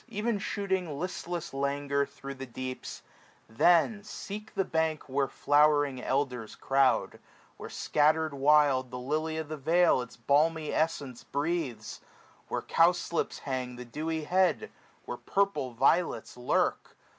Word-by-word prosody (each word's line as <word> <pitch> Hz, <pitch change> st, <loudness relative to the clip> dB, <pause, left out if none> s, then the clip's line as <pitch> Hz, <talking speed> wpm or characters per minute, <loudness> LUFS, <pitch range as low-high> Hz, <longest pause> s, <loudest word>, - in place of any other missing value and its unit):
Even 220 Hz, -1 st, -1 dB
shooting 190 Hz, -7 st, -2 dB
listless 175 Hz, -1 st, -4 dB
languor 140 Hz, 0 st, 0 dB
thro' 140 Hz, 0 st, -8 dB
the 135 Hz, 0 st, -8 dB
deeps; 130 Hz, +1 st, -6 dB, 0.4 s
Then 175 Hz, -, +3 dB
seek 210 Hz, +1 st, -8 dB
the 195 Hz, -, +1 dB
bank 160 Hz, -3 st, -1 dB
where 135 Hz, 0 st, 0 dB
flowering 145 Hz, -3 st, +3 dB
elders 125 Hz, -5 st, -2 dB
croud, 135 Hz, -1 st, +1 dB, 0.4 s
Where -, -, -8 dB
scatterM 155 Hz, +1 st, +1 dB
wild 140 Hz, -2 st, +4 dB
the 125 Hz, -, -6 dB
lily 155 Hz, +5 st, -2 dB
of 160 Hz, -1 st, -4 dB
the 155 Hz, +1 st, -5 dB
vale 165 Hz, 0 st, +3 dB
Its 125 Hz, -1 st, -9 dB
balmy 155 Hz, +6 st, +1 dB
essence 145 Hz, -6 st, -1 dB
breathes, 140 Hz, -7 st, -3 dB, 0.5 s
where -, -, -3 dB
cowslips 170 Hz, 0 st, +1 dB
hang 130 Hz, -2 st, -3 dB
445 -, -, -13 dB
The 125 Hz, -1 st, -10 dB
dewy 160 Hz, 0 st, -2 dB
head, 185 Hz, -, +1 dB, 0.3 s
where -, -, -5 dB
purple 195 Hz, -11 st, 0 dB
violets 135 Hz, 0 st, +1 dB
lurk. 125 Hz, 0 st, -1 dB
150 Hz, 135 wpm, -29 LUFS, 135-170 Hz, 0.5 s, wild